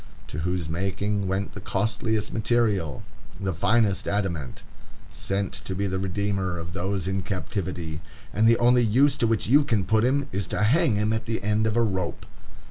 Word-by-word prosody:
To 75 - -5
whose 90 0 -1
making 100 +4 -1
went 95 +1 -2
the 105 - -8
costliest 110 +2 -1
material, 110 - +1 0.4
the 95 -1 -1
finest 100 +2 +2
adamant; 95 -9 -2 0.5
sent 100 0 -2
to 95 - -4
be 100 +2 -1
the 95 -1 -1
redeemer 95 -1 -1
of 85 +1 -6
those 95 +1 -2
in 95 0 -1
captivity. 90 -4 -4 0.3
And 110 +4 +3
the 115 0 +6
only 125 +1 +4
use 130 +6 +4
to 115 - +2
which 110 -1 +1
you 145 +6 +5
can 110 -9 0
put 110 +3 +2
him 135 +3 +1
is 95 -1 -2
to 105 - -1
hang 135 +2 +3
him 105 +1 +1
at 110 0 -3
the 110 -2 -2
end 105 +1 +2
of 110 +1 0
a 120 - +4
rope! 95 -5 -2
100 Hz, 185 wpm, -25 LUFS, 95-110 Hz, 0.5 s, the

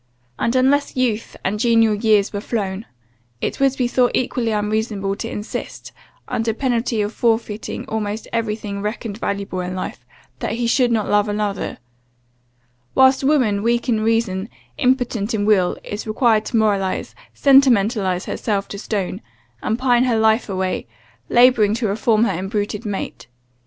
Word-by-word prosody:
And 230 - 0
unless 270 +3 +2
'youth, 235 -4 -1
and 205 +2 -1
genial 225 -2 +4
years 210 -1 +2
were 205 - -3
flown,' 205 -2 -3 0.5
it - - -3
would 270 -1 +2
be 250 - +1
thought 245 0 +2
equally 245 -2 0
unreasonable 210 -2 -1
to 230 - -4
insist, 210 0 -6 0.4
[under 225 -1 -1
penalty 235 -3 0
of] 205 +2 -4
forfeiting 225 -2 -1
almost 215 0 -3
every 225 -2 0
thing 200 -2 -6
reckoned 210 0 -4
valuable 200 -3 -3
in 180 0 -4
life, 155 -9 -5 0.4
that - - -2
he 235 +1 -1
should 240 +1 +2
not 220 -3 +1
love 205 0 +2
another: 205 -1 -2 1.2
whilst 265 +1 +5
woman, 255 -8 +2
weak 235 +3 0
in 220 -2 +2
reason, 220 -3 0 0.3
impotent 245 -5 +1
in 205 -1 0
will, 195 -4 +3
is 210 +2 -6
required 220 -1 +2
to 235 - -1
moralize, 200 -3 0 0.2
sentimentalize 220 -9 +3
herself 200 -3 -2
to 200 - -6
stone, 195 -3 -3 0.4
and 220 - -1
pine 245 -1 +3
her 240 -3 +2
life 220 +1 +2
away, 185 -1 -2 0.4
labouring 235 -4 +5
to 230 0 -2
reform 215 +2 +2
her 235 - +2
embruted 205 +4 -3
mate. 190 - -5
220 Hz, 150 wpm, -20 LUFS, 205-240 Hz, 1.2 s, whilst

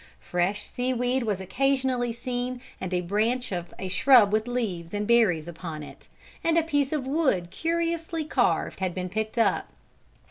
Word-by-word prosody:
Fresh 180 +4 -1
seaweed 250 +1 -1
was 210 -5 -1
occasionally 255 +3 0
seen 245 +1 -3 0.2
and 185 -1 -4
a 180 -1 +1
branch 220 +7 0
of 175 -2 -4
a 190 - -4
shrub 210 +2 +5
with 215 +2 +1
leaves 205 -8 -3
and 205 0 -1
berries 200 -10 +3
upon 165 -3 -6
it, - - -12 0.4
and 330 0 +2
a 335 - +4
piece 290 -4 0
of 300 -4 -1
wood 265 - +1
curiously 330 -1 -1
carved 305 - +1
had 185 -2 -2
been 185 -1 -3
picked 220 +4 -3
up. 230 - +2
235 Hz, 165 wpm, -26 LUFS, 185-265 Hz, 0.4 s, shrub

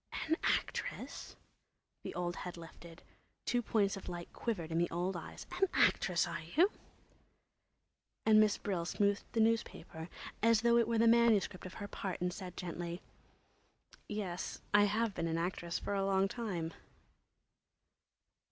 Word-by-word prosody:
"An 320 - +3
actress!" - - -2 0.7
The - - -6
old 175 0 -2
head 180 -1 -6
lifted; 165 0 -12 0.4
two 245 - +2
points 205 -4 +1
of 195 - -8
light 175 -1 -6
quivered 175 -9 -3
in 165 - +1
the 175 - +2
old 180 +2 -1
eyes. 170 - -7
"An 390 +2 +2
actress—are 170 -2 +2
ye?" 230 - +4 1.6
And 215 -1 +7
Miss 215 -1 +4
Brill 185 -4 -2
smoothed 200 +3 0
the 230 - +1
newspaper 220 -7 0 0.3
as 230 0 +5
though 235 0 +5
it 230 -2 +4
were 230 -1 +1
the 230 +1 +5
manuscript 225 -5 +4
of 185 - -11
her 205 - -5
part 190 -2 -4
and 180 0 -1
said 185 -3 -8
gently; 175 0 -5 1.1
"Yes, 190 -4 -3
I 205 0 +7
have 215 +1 +1
been 170 - -2
an 165 0 0
actress 170 0 -2
for - - -3
a 195 -1 +1
long 195 0 +3
time." 185 -7 -3
195 Hz, 150 wpm, -34 LUFS, 175-220 Hz, 1.6 s, And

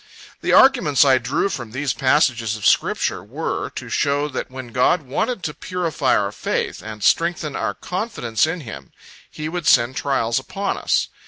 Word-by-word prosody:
The - - 0
arguments 210 - +5
I 130 -2 +5
drew - - 0
from 120 - -6
these 135 -1 -1
passages 125 -5 +1
of 105 - -7
Scripture - - +1
were, - - -4
to - - -6
show 145 +1 0
that 135 - -5
when 130 -1 -8
God 130 +8 +2
wanted 215 - -2
to 150 - -3
purify 180 -3 0
our 100 -1 -1
faith, - - -3
and 105 -1 -8
strengthen 165 - +1
our 100 - -2
confidence 165 - -1
in 165 +1 -3
Him, 115 -7 -10 0.4
He 155 - -6
would 175 0 -4
send 120 +1 +4
trials 135 -6 0
upon 195 +8 -3
us. - - +1
140 Hz, 170 wpm, -21 LUFS, 120-170 Hz, 0.4 s, arguments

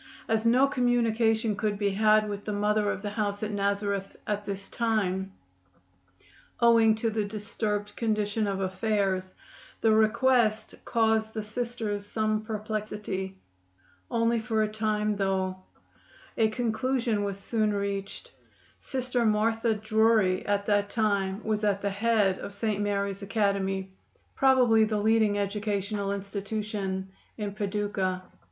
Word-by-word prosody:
As 220 +1 +1
no 250 +4 +5
communication 230 -4 +1
could 205 0 -1
be 200 -1 +1
had 215 +1 +4
with 205 -1 -5
the 210 - -2
Mother 210 0 +1
of 205 - -3
the 205 - -3
house 205 -1 -2
at 215 - -2
Nazareth 200 -1 -1
at 210 0 -3
this 195 0 -5
time, 195 -5 -1 1.3
owing 230 -2 +5
to 225 +1 -1
the 215 -1 0
disturbed 205 0 -3
condition 215 -1 0
of 195 -1 -2
affairs, 190 -1 -1 0.5
the 225 - +4
request 220 +1 +3
caused 220 -1 +1
the 215 - -2
Sisters 220 -2 -3
some 215 +1 -1
perplexity. 210 -3 -4 0.7
Only 230 0 +2
for 220 -1 0
a - - +1
time, 210 -1 -1
though. 190 -1 0 0.8
A 225 - +3
conclusion 235 0 0
was 200 -1 -3
soon 215 +1 0
reached. 200 - -4 0.5
Sister 255 -2 -1
Martha 225 +1 +2
Drury 215 -3 +2
at 200 0 +1
that 205 -1 +2
time 200 -2 0
was 215 -1 -1
at 200 -1 +1
the 200 - 0
head 205 -2 +2
of 200 - -7
St. 210 -1 -1
Mary's 200 -1 -1
Academy, 195 -2 -1 0.4
probably 250 -5 +5
the 215 0 0
leading 215 -1 +3
educational 200 0 -2
institution 200 -1 -3 0.3
in 205 -2 -3
Paducah. 200 -3 -2
210 Hz, 130 wpm, -28 LUFS, 200-220 Hz, 1.3 s, no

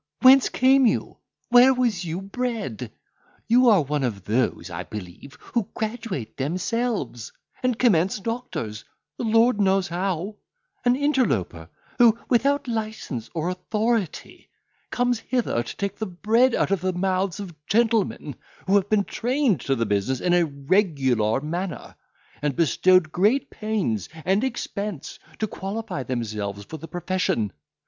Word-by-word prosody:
—whence 260 +1 +8
came 265 0 +4
you?—where 245 +3 +2
was 235 -8 0
you 170 +2 -4
bred? 200 - -4 0.6
You 245 +1 +5
are 200 -8 +5
one 145 0 -2
of 105 -7 -2
those, 115 -4 -1
I 85 +2 -4
believe, 100 +6 -9 0.2
who 230 -3 0
graduate 220 - -4
themselves, 180 - -2 0.3
and 250 -3 0
commence 195 -5 +3
doctors, 190 - -4 0.4
the - - -2
Lord 225 0 +3
knows 195 -1 +2
how; 185 +3 -2 0.5
an 245 0 +4
interloper, 240 - 0 0.3
who, 230 -2 +6
without 275 +3 +2
licence 215 - -4
or 165 +2 -1
authority, 210 +1 -2 0.4
comes 245 -2 0
hither 240 - -1
to 120 - -8
take 200 0 -3
the 220 - -2
bread 225 +7 +2
out - - 0
of 195 -4 +1
the 185 0 0
mouths 185 0 -1
of 195 -4 -7
gentlemen 220 - +1 0.3
who 195 - +1
have 200 0 -1
been 215 -2 +3
trained 245 - 0
to 135 - 0
the 115 -2 0
business 105 +5 0
in 180 - +1
a 175 -1 +4
regular 140 - +1
manner, 170 +4 -4 0.5
and 145 -2 -1
bestowed 170 +1 +3
great 215 +11 +2
pains 200 - -2 0.2
and 195 +5 +2
expense 210 - -4 0.2
to 220 - 0
qualify 200 -4 -5
themselves 105 -5 -4
for 160 - -8
the 165 +2 -9
profession. 175 - -1
190 Hz, 140 wpm, -24 LUFS, 140-230 Hz, 0.6 s, whence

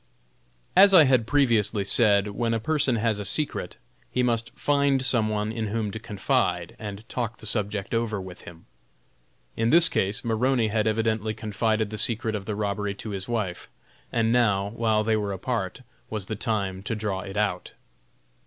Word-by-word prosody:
As 195 +1 +7
I 165 - +9
had 130 -5 +2
previously 115 -7 +2
said, 100 -1 +4
when 115 +3 -1
a - - -1
person 140 0 +1
has 110 -2 0
a - - -3
secret, 145 +10 -2 0.3
he 125 - 0
must 115 -1 0
find 140 -2 +1
some 115 -5 +2
one 105 0 -2
in 115 -1 -3
whom 105 0 -2
to 110 - -6
confide, 105 -2 -1
and 105 +1 -8
talk 115 -2 -4
the - - -10
subject 105 -2 +1
over 115 -3 -1
with 95 -1 -9
him. 85 -1 -13 0.9
In 115 +1 0
this 170 +3 +7
case 100 +5 -1
Maroney 115 0 +1
had 110 0 0
evidently 110 0 -1
confided 110 0 -1
the 110 - -5
secret 110 0 0
of 100 -2 -4
the 105 - -3
robbery 100 -1 -2
to 105 +2 -7
his 95 -1 -5
wife, 105 -7 -3 0.4
and 115 0 +1
now, 100 -5 +2
while 110 -1 0
they 110 0 +1
were 105 -2 -2
apart, 95 +1 -3 0.3
was 105 -3 -2
the 110 - -4
time 100 -3 -2
to 115 +3 -3
draw 105 -3 -3
it 95 +1 -7
out. 100 -4 -2
110 Hz, 180 wpm, -25 LUFS, 100-115 Hz, 0.9 s, I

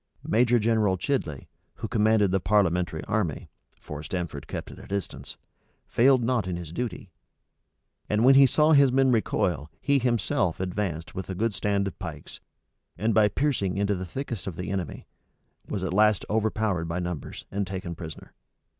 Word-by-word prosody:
Major 120 +2 +4
General 110 -4 +2
Chidley, 85 - -2 0.3
who - - -5
commanded 105 -2 +3
the 95 - +2
parliamentary 90 -5 +1
army, 105 -8 -2 0.3
(for 75 -1 -7
Stamford 85 -6 -5
kept - - -6
at - - -12
a - - -12
distance,) 100 -2 -5 0.5
failed 130 0 +4
not 115 -5 +1
in 90 - -2
his 85 -3 -7
duty; 110 -3 -5 1.0
and 105 +3 +2
when 135 - +8
he 135 0 +8
saw 150 +4 +3
his 140 -3 +6
men 135 0 +4
recoil, 90 - 0
he 140 -1 +2
himself 115 -8 0
advanced 90 -3 -3
with 95 - -6
a 95 - -3
good 110 +3 0
stand 100 +1 0
of 95 - -6
pikes, 80 -6 -8 0.6
and 110 +3 0 0.2
piercing 120 -10 0
into 100 0 +1
the 95 -1 -4
thickest 120 - -5
of 90 - -4
the 90 +2 -4
enemy, 95 -4 -4 0.6
was 100 -3 -3
at 90 -1 -2
last 105 0 +3
overpowered 110 -5 0
by 85 +1 -3
numbers, 90 -4 -5
and 100 0 -2
taken 90 -2 -5
prisoner. 80 -2 -9
100 Hz, 165 wpm, -26 LUFS, 90-115 Hz, 1.0 s, when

